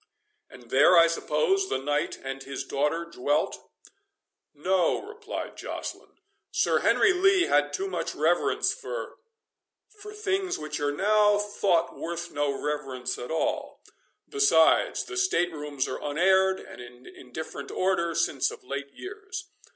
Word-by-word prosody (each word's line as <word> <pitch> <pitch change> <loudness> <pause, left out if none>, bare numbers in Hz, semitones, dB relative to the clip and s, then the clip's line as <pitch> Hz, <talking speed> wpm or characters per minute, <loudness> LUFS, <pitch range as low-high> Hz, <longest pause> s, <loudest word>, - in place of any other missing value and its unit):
"And 125 -2 -15
there, 145 +7 +6
I 165 - +8
suppose, 170 +3 +1
the 130 - 0
knight 145 +3 -1
and 135 0 -5
his 135 0 -5
daughter 150 +4 -1
dwelt?" 145 -3 -1 0.9
"No," 180 +4 +1
replied 435 +2 -7
Joceline; - - -7 0.3
"Sir - - +2
Henry 370 - +4
Lee 380 0 +4
had 145 - +2
too 170 +7 -2
much 175 -3 -3
reverence 165 +4 +2
for—for 450 -3 -11
things 390 -3 -1
which 155 0 -5
are 145 0 0
now 210 +5 +3
thought 205 -4 0
worth 170 0 -5
no 145 -1 0
reverence 135 -3 -3
at 120 - -6
all—Besides, 415 - +1
the 365 - -7
state 365 - +2
rooms 145 -3 -3
are - - -5
unaired, 190 +5 +3
and - - -11
in 120 +1 -13
indifferent 130 +6 -8
order, 170 -3 0
since 135 -3 +1
of - - -11
late 140 +2 -5
years. 395 0 -8
170 Hz, 135 wpm, -27 LUFS, -, 0.9 s, I